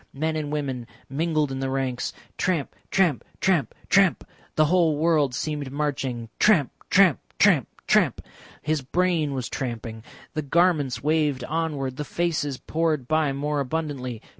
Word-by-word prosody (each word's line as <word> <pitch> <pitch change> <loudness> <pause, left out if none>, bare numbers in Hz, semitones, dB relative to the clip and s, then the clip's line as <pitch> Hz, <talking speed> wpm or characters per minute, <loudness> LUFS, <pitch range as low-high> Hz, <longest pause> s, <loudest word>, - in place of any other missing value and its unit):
Men 155 +3 -1
and 150 -2 -3
women 135 -5 -3 0.2
mingled 155 0 0
in 135 - -3
the 135 0 -1
ranks; 130 -2 -1 0.2
tramp, 175 -7 -1 0.2
tramp, 175 -9 +2 0.2
tramp, 180 -7 +1
tramp. 195 -3 +3 0.3
The 155 - +5
whole 165 -2 +3
world 150 -5 +2
seemed 145 -1 -3
marching. 135 -5 -2
Tramp, 170 -11 +4 0.2
tramp, 185 -6 +5 0.2
tramp, - - +4 0.2
tramp; - - +3 0.4
his 155 -1 0
brain 160 0 0
was 130 -2 -3
tramping. 115 -3 -5 0.3
The 155 - -1
garments 145 -5 +2
waved 150 -4 +1
onward, 145 -3 -2
the 150 - -2
faces 150 -3 -1
poured 155 -5 -1
by 155 -1 +2
more 145 +2 -1
abundantly. 135 -5 -3
150 Hz, 140 wpm, -25 LUFS, 135-160 Hz, 0.4 s, The